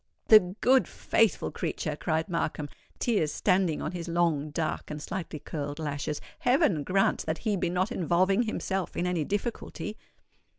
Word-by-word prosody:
"The 190 -4 +7
good, 260 +1 +5
faithful 225 -4 +1
creature!" 155 -2 -3
cried 160 +1 -1
Markham, 155 -4 -2 0.3
tears 200 -11 +1
standing 185 -4 +1
on 155 - -2
his 175 -1 -5
long, 165 -3 +1
dark, 155 +1 -3
and 150 - -5
slightly 165 +1 -5
curled 145 -1 -5
lashes. 150 -1 -3 0.2
"Heaven 245 - +3
grant 195 +5 +2
that 160 0 0
he 210 -2 +2
be 175 -2 0
not 185 +5 0
involving 185 +2 +2
himself 195 -4 -2
in 175 - 0
any 180 -3 0
difficulty." 210 - -3
175 Hz, 155 wpm, -28 LUFS, 155-195 Hz, 0.3 s, The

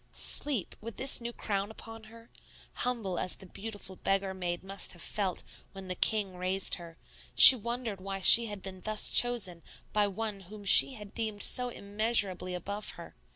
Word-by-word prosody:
Sleep! 265 -11 0
With 230 0 -9
this 265 -2 +3
new 235 0 -6
crown 200 -3 -4
upon 225 0 -12
her! 230 +1 -17 0.4
Humble 225 -8 -3
as 185 - 0
the 190 - -13
beautiful 200 -1 -8
beggar 195 0 -2
maid 175 -2 -5
must 195 +1 +1
have 175 - -13
felt 195 -4 -2 0.3
when 195 -1 -11
the - - -2
king 200 0 0
raised 185 +2 -1
her, 165 -1 -13 0.4
she 265 - +11
wondered 235 -3 -6
why 195 0 -6
she 230 +5 +7
had 205 -3 -9
been 190 -1 -10
thus 215 +1 +2
chosen 205 -9 +1 0.3
by 210 -1 +1
one 210 +1 -5
whom 205 +2 -13
she 260 +6 +6
had 210 -3 -12
deemed 215 -3 -1
so 250 0 +2
immeasurably 200 -4 0
above 200 +4 -6
her. - - -12
205 Hz, 175 wpm, -29 LUFS, 190-225 Hz, 0.4 s, she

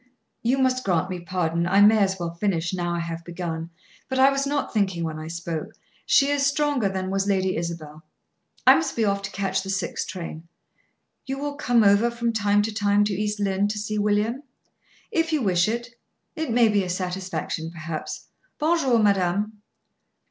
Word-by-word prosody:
"You 245 +3 +1
must 255 -1 +1
grant 185 -1 0
me 180 - -4
pardon. 170 -1 -1
I 195 +3 +3
may 215 +2 +7
as 190 -1 +2
well 170 -1 -3
finish, 170 -2 -1
now 175 -1 -1
I 170 - -1
have 170 0 -5
begun; 170 -1 -5 0.4
but 260 - -1
I 265 +1 +6
was 275 0 0
not 285 0 -2
thinking 190 -6 0
when 160 -1 -4
I 155 - -7
spoke. 165 -1 -5 0.3
She 280 0 +5
is 285 -1 +1
stronger 285 -6 +1
than 190 0 -3
was 195 0 0
Lady 190 -2 +1
Isabel. 160 -2 -5 0.6
I - - +10
must 320 -5 0
be 225 - +1
off 200 -1 0
to 195 - -5
catch 195 -1 -1
the 195 - -7
six 190 -3 -2
train." 170 -2 -7 0.8
"You 270 0 -3
will 290 +1 -3
come 245 -5 +2
over 200 +3 +5
from 235 0 -2
time 205 -1 +2
to 220 +1 -3
time 205 0 +3
to 205 -1 0
East 210 +2 -2
Lynne 200 0 +1
to 210 +1 -3
see 210 0 -2
William?" 210 +5 +1 0.7
"If 330 -5 +1
you 305 -5 +1
wish 180 -2 +3
it. 235 +2 -2 0.5
It 315 -2 -3
may 235 0 +4
be 205 -2 +2
a 180 - -5
satisfaction, 180 -2 -3
perhaps. 160 -1 -6 0.3
Bon 330 +3 +2
jour, 255 -6 +3
madame." 205 0 +1
200 Hz, 190 wpm, -24 LUFS, 175-235 Hz, 0.8 s, I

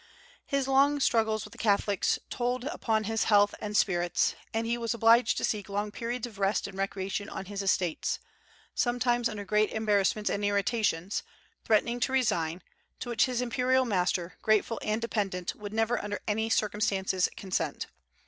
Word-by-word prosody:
His 275 -2 0
long 280 +2 +4
struggles 220 -4 +1
with - - -12
the - - -14
Catholics 205 -2 +2
told 245 0 -1
upon 225 -7 -1
his 225 +1 0
health 205 -1 +4
and 210 0 -1
spirits, 175 -3 +2 0.2
and 225 +1 -1
he 235 +1 0
was 235 -1 -2
obliged 230 +1 +4
to - - -2
seek 210 -2 -1
long 205 +1 -2
periods 240 +2 -3
of 220 -5 -11
rest 195 +1 +1
and 200 - -7
recreation 195 +1 -3
on 190 - -6
his 200 +1 -4
estates, 185 -4 0 0.6
sometimes, 240 -1 +1
under 205 -2 -6
great 210 +2 +2
embarrassments 210 -1 +1
and 205 - -2
irritations, 205 -2 0 0.4
threatening 235 +2 +2
to 250 - 0
resign, 175 -10 0 0.4
to 245 - -5
which 235 -2 +3
his 250 -2 -1
imperial 255 +2 +2
master, 180 -4 -1
grateful 215 +1 +2
and 215 +2 -1
dependent, 195 -6 -2
would 205 -1 -8
never 225 +2 0
under 205 0 -3
any 220 +1 0
circumstances 200 -4 +1
consent. 190 -1 -2
215 Hz, 165 wpm, -29 LUFS, 200-235 Hz, 0.6 s, long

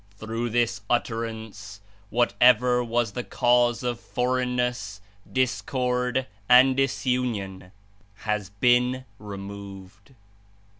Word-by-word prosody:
Through 115 +3 -3
this 115 -3 0
Utterance 110 -4 -3 0.3
whatever 125 +1 +3
was 120 -2 0
the 125 - -4
107 - - -17
cause 120 -1 +2
of 120 -1 -2
forelgnness, 125 -3 -1 0.3
discord 125 0 0 0.2
and 130 +1 +7
disunion, 120 -8 -1 0.4
has 105 -2 -3
been 125 +5 +2
removed." 100 +2 -10
120 Hz, 90 wpm, -25 LUFS, 105-125 Hz, 0.4 s, and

